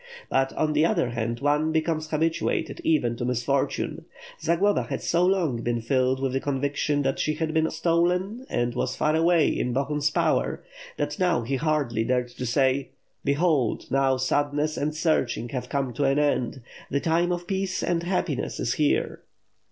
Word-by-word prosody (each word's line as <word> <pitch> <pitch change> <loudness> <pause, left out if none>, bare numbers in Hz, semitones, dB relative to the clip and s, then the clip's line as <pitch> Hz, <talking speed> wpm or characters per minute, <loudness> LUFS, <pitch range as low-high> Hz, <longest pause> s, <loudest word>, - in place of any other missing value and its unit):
But 135 0 +2
on 155 -1 0
the 150 +1 +3
other 170 - +1
hand 115 0 -3
one 150 +2 +2
becomes 160 -1 -1
habituated 160 +1 -1
even 125 -7 +2
to - - -3
misfortune. 125 +2 -1 0.4
Zagloba 170 +6 +2
had - - -4
so 170 +1 +2
long 170 -11 +1
been 120 0 -1
filled 130 +2 +1
with 135 -1 -1
the 135 - +1
conviction 145 +1 -1
that 135 0 -1
she 155 - 0
had 155 0 -2
been 160 0 +2
stolen 180 +9 0
and 120 0 0
was 130 +1 -2
far 155 +1 +1
away 165 0 +4
in 125 -1 -1
Bohun^s 145 +2 0
power, - - 0 0.3
that - - -2
now 180 -8 +2
he 135 +4 -1
hardly 140 -7 0
dared 125 +1 0
to 125 +1 -5
say: 130 +2 +1 0.3
'Behold, 140 -5 +1
now 135 0 +2
sadness 145 +3 0
and 150 +2 -2
searching 155 -7 0
have 125 -1 -4
come 135 -3 -1
to 140 +4 0
an 135 +1 +2
end, 135 -4 0 0.3
the 140 - 0
time 170 +4 +1
of 175 0 -2
peace 190 0 -2
and 175 -1 0
happiness 175 -5 -2
is 120 - 0
here. 150 -2 0
145 Hz, 175 wpm, -25 LUFS, 130-165 Hz, 0.4 s, away